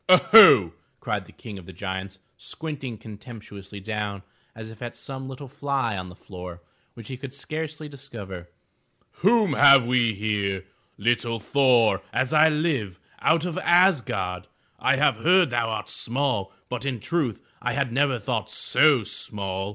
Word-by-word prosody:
Oho!'* 185 - +8 0.3
cried - - -3
the - - -17
King 105 -3 -10
of 85 - -15
the - - -10
Giants, 95 +1 -6 0.2
squinting 135 -6 -6
contemptuously 105 -2 -11
down 105 -1 -5 0.3
as 110 0 -9
if 110 - -15
at 120 -1 -6
some 135 -1 -8
little 135 +1 -9
fly 135 -4 -2
on 90 -1 -6
the 90 - -13
floor, 90 -2 -10 0.3
which 115 - -11
he 130 - -7
could 135 +1 -9
scarcely 155 +1 -6
discover. 105 -11 -10 0.7
*'Whom 210 +2 +3
have 140 -3 +7
we 120 -3 +1
here? 100 -2 -2 0.3
Little 115 +1 0
Thor, 115 -4 +2
as 130 +2 -1
I 155 +1 +6
live, 145 - -2 0.2
out 165 +1 +2
of 175 -3 -3
Asgard. 120 - +1 0.3
I - - +2
have - - +2
heard 175 +4 +3
thou 120 -1 0
art 110 - -4
small, 120 -6 -2 0.2
but 125 0 -5
in 135 -4 -3
truth 145 -4 -2 0.2
I 125 0 -2
had 140 -3 -1
never 135 0 +1
thought 105 - -3
so 145 -7 +3
small! 95 -1 -4
120 Hz, 155 wpm, -24 LUFS, 100-140 Hz, 0.7 s, Oho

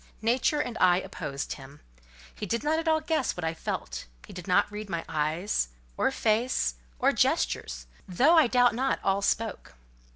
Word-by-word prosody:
Nature 250 +6 +2
and 245 -5 -3
I 180 -1 +5
opposed 140 -6 -5
him. 140 +1 -12 0.5
He 210 - -6
did 235 +6 -1
not 310 +2 +1
at 330 - -4
all 315 0 +3
guess 310 - -1
what 175 - -4
I 160 0 0
felt: 60 - -5 0.2
he - - -12
did 180 0 -8
not 185 +2 +3
read 210 0 -6
my 170 -2 -3
eyes, 155 - 0 0.3
or - - +2
face, 220 - +1 0.2
or - - +3
gestures; - - 0 0.2
though, 265 - +4
I 315 -5 +6
doubt 245 -1 +4
not, 265 +3 0
all 195 0 +1
spoke. 210 - -2
210 Hz, 175 wpm, -28 LUFS, 165-255 Hz, 0.5 s, I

